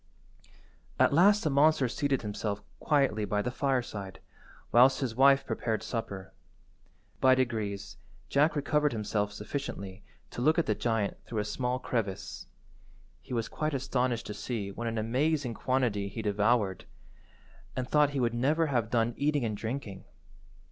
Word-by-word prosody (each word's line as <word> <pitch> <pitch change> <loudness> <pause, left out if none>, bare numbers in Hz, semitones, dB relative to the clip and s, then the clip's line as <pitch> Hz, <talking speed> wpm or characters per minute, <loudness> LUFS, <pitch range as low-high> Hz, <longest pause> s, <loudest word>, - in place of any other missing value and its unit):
At - - +4
last 200 +6 +5
the 155 - +1
monster 140 -1 +4
seated 135 +1 -1
himself 105 -1 -3 0.2
quietly 135 -8 +2
by 105 0 0
the 125 - -2
fireside, 120 -8 -2 0.5
whilst 125 +3 +6
his 130 -5 -2
wife 135 +2 +5
prepared 110 -2 -2
supper. 100 -5 -5 0.9
By 130 0 +6
degrees 105 -6 -2 0.3
Jack 150 +4 +3
recovered 150 0 +1
himself 105 -1 -1
sufficiently 105 -5 -6 0.3
to - - -5
look 155 +6 +3
at 170 - +2
the - - +1
giant 115 -4 -1
through 115 - -5
a 105 - 0
small 125 +3 -1
crevice. 110 -7 -4 0.7
He 125 - -6
was 115 -1 -1
quite 155 -1 -2
astonished 125 -2 -1
to 105 - -5
see 105 -3 -4
what 115 +4 -5
an 115 0 -2
amazing 130 +4 0
quantity 120 -5 0
he 110 +3 -6
devoured, 105 -2 +1 0.9
and 130 -1 -2
thought 150 0 +4
he 140 -1 -3
would 120 -2 +1
never 145 +7 +2
have 120 -7 0
done 120 0 +1
eating 145 -2 +1
and 110 -2 -2
drinking. 110 -3 -5
120 Hz, 150 wpm, -30 LUFS, 105-140 Hz, 0.9 s, whilst